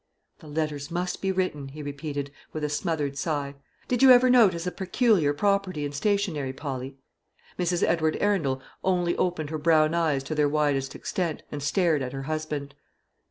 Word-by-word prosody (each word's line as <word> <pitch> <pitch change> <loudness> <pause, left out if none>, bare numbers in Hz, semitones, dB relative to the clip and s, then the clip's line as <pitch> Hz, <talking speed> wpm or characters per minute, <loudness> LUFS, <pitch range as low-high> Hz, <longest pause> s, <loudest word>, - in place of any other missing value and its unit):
"The 155 - -14
letters 150 -1 -3
must 175 +1 -3
be 195 - +1
written," 180 -7 -2
he 150 +2 -8
repeated, 145 -1 -5 0.2
with 155 - -4
a 150 - 0
smothered 145 -2 -2
sigh. 145 -3 -2 0.3
"Did 250 0 0
you 265 - +8
ever 250 0 +7
notice 195 -9 +4
a 180 - -1
peculiar 190 - +2
property 185 -1 0
in 145 - -4
stationery, 155 -4 -1
Polly?" 135 -1 -6 0.6
Mrs. 175 -1 +1
Edward 160 -2 +2
Arundel 150 -11 0 0.2
only 175 -2 +1
opened 160 -4 -1
her 155 - -3
brown 155 0 +4
eyes 155 -5 +1
to 155 - -4
their 150 -1 +2
widest 145 -3 0
extent, 170 -4 -3
and 145 - -5
stared 155 0 +2
at 130 0 -4
her 135 0 -5
husband. 150 -1 -4
155 Hz, 170 wpm, -26 LUFS, 145-180 Hz, 0.6 s, you